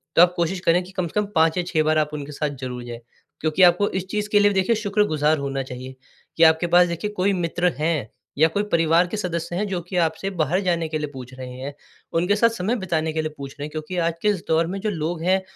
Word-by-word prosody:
तो - - +7
आप 180 0 +6
कोशिश 175 +2 -1
करें 175 +1 +3
कि 180 - -13
कम 185 -2 -2
से 190 - -1
कम - - -2
5 160 +1 +3
या 180 - +1
6 155 -3 +1
बार 155 0 +2
आप 155 -1 +2
उनके 145 -1 -5
साथ 150 +1 -2
ज़रूर 125 -1 -5
जाएँ। 120 -1 -8 0.4
क्योंकि 155 +4 +2
आपको 180 +3 +5
इस 190 0 -3
चीज़ 210 0 -2
के 210 - +4
लिए 205 0 +5
भी - - -1
देखिए 190 +5 +2
शुक्रगुज़ार 200 -8 +1
होना 135 -1 -3
चाहिए, 130 0 -8 0.4
कि 165 - +5
आपके 160 +1 +5
पास 175 +1 +5
देखिए 170 +5 -3
कोई 200 0 +1
मित्र 175 0 0
हैं 155 -7 0 0.3
या 160 - +6
कोई 200 +6 -1
परिवार 165 +1 +3
के 195 - -4
सदस्य 175 -3 -3
हैं 205 +4 -1
जो 190 -3 -2
कि 185 - -6
आपसे 165 +4 -3
बाहर 160 +5 +1
जाने 170 -3 0
के 155 - -1
लिए 150 - -2
पूछ 130 -1 -9
रहे 130 -1 -8
हैं। 140 +2 -5 0.5
उनके 180 +4 +2
साथ 230 +2 +4
समय 225 +1 -1
बिताने 160 -5 -1
के 160 - 0
लिए 155 0 -3
पूछ 140 -1 -7
रहे 145 - -4
हैं - - -6
क्योंकि 155 +4 -5
आज 165 0 +1
के - - 0
इस 195 -5 -1
दौर 160 +1 +2
में 195 +3 -4
जो 215 - -1
लोग 165 -2 -3
हैं 190 +2 +3
170 Hz, 265 wpm, -23 LUFS, 155-190 Hz, 0.5 s, तो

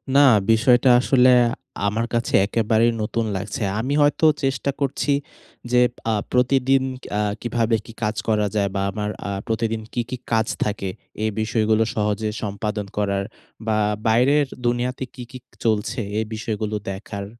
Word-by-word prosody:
না, 140 - +7 0.3
বিষয়টা 120 +3 +4
আসলে 130 -1 +4 0.6
আমার 110 +3 0
কাছে 115 0 -1
একেবারেই 115 +2 +2
নতুন 115 +2 -1
লাগছে। 100 +3 -4 0.2
আমি 130 +5 -1
হয়তো 145 +2 +3 0.2
চেষ্টা 135 +1 0
করছি 140 +1 0 0.6
যে 125 - +5 0.3
আ - - +2 0.2
প্রতিদিন 130 +1 +3 0.4
আ - - +2 0.2
কীভাবে 115 -1 +1
কী 115 - -11
কাজ 105 0 0
করা 105 -2 +2
যায় 100 -2 +1
বা 95 - 0
আমার 105 0 -3 0.2
আ - - -3 0.2
প্রতিদিন 110 0 -1
কী, 120 - 0
কী 130 - -4
কাজ 110 -1 +2 0.2
থাকে, 105 -2 -2 0.3
এই 110 - +1
বিষয়গুলো 110 0 +2
সহজে 105 0 0
সম্পাদন 105 0 -3
করার 100 -1 0 0.4
বা 110 -1 +2 0.3
বাইরের 135 +6 +4 0.2
দুনিয়াতে 120 +2 0
কী, 125 - -7
কী 130 - -7 0.3
চলছে 110 +3 0 0.2
এই 110 - -1
বিষয়গুলো 110 -1 -3
দেখার, 100 +1 -6
110 Hz, 150 wpm, -22 LUFS, 105-125 Hz, 0.6 s, না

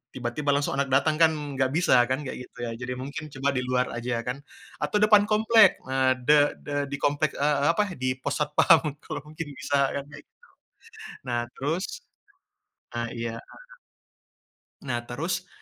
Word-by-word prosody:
tiba-tiba 130 +4 -3
langsung 140 -1 -1
anak 140 - +1
datang 155 +3 +2
kan, 160 -1 +6 0.3
gak 130 - +3
bisa 165 -7 +4
kan, 135 +3 -1
kayak 125 -1 -7
gitu - - -26
ya. 115 - -3
Jadi 125 0 -4
mungkin 140 +4 -6
coba 135 +1 0
di 130 - -1
luar 125 0 0
aja 120 0 -3
kan, 130 +3 -3 0.4
atau - - -2
depan 210 -1 +6
komplek 220 -1 +5
nah 130 0 +2
de 145 +3 +3
de 145 - -7 0.2
di - - -1
komplek, 145 +2 +1
eee, 145 0 +1
apa, 210 - +2 0.2
di 130 0 0
pos 135 - -3
satpam 150 +2 +5 0.2
kalau - - -5
mungkin 155 0 -6
bisa 145 - -1 0.2
kan 140 - -3
kayak - - -12
gitu. - - -61 0.9
Nah 120 -2 -1 0.2
terus 160 +7 -1 1.1
ah, 120 - -1
iya. 115 0 -4 1.5
Nah, 120 -2 -2
terus 170 +8 -3
140 Hz, 165 wpm, -26 LUFS, 130-155 Hz, 1.5 s, kan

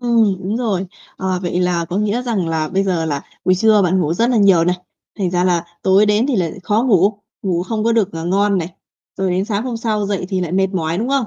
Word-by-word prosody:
Ừm, 230 -5 +2
đúng 200 +4 -2
rồi. 205 -6 -1 0.3
À, 190 - -5 0.2
vậy 175 0 -1
là 180 -2 0
có 175 +2 -5
nghĩa 210 +4 0
rằng 215 -9 -1
là 160 -1 -1
bây 195 +4 0
giờ 180 -4 0
là 145 -3 -2 0.2
buổi 185 - +4
trưa 215 +2 +4
bạn 185 +1 +2
ngủ 165 0 0
rất 235 +6 +1
là 245 - +2
nhiều 195 -6 +5
này, 180 +1 +1 0.4
thành 190 -3 0
ra 180 0 +1
là 175 -2 +1 0.2
tối 195 +2 +4
đến 210 +4 +2
thì 275 -4 0
lại 175 -4 0
khó 210 +4 +1
ngủ, 205 -5 +3 0.3
ngủ 175 -3 0
không 215 +3 -3
có 230 - +3
được, 215 -4 +1
à, 165 -1 -5
ngon 195 +3 +1
này. 170 -1 -3 0.5
Rồi 190 -1 -1
đến 185 +2 0
sáng 210 -1 -2
hôm 250 -2 -3
sau 215 -3 -1
dậy 195 -2 -2
thì 190 -2 -1
lại 175 -2 -3
mệt 190 +1 +2
mỏi, 170 -3 -2
đúng 230 +4 -2
không? 275 -3 +1
195 Hz, 260 wpm, -18 LUFS, 180-215 Hz, 0.5 s, nhiều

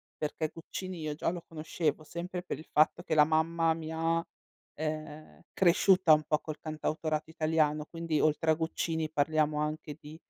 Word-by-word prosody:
perché 155 +1 -3
Guccini 185 +2 -6
io 155 -1 -3
già 155 - 0
lo 175 -1 -6
conoscevo, 155 -1 -2
sempre 175 +3 -5
per 165 - -5
il 155 - -12
fatto 155 +3 +3
che 165 -3 -1
la 150 - +8
mamma 160 +1 +2
mi 160 -1 -6
ha, 165 +1 0 0.5
ehm, 155 0 -5
cresciuta 185 -2 +5
un 155 - +4
po' 150 - +3
col 155 0 -7
cantautorato 155 0 -2
italiano, 155 -1 +1
quindi 165 -2 -2
oltre 155 +1 +3
a - - +6
Guccini 160 0 -2
parliamo 155 0 +1
anche 150 -1 -3
di 150 +1 -11
155 Hz, 170 wpm, -31 LUFS, 155-165 Hz, 0.5 s, la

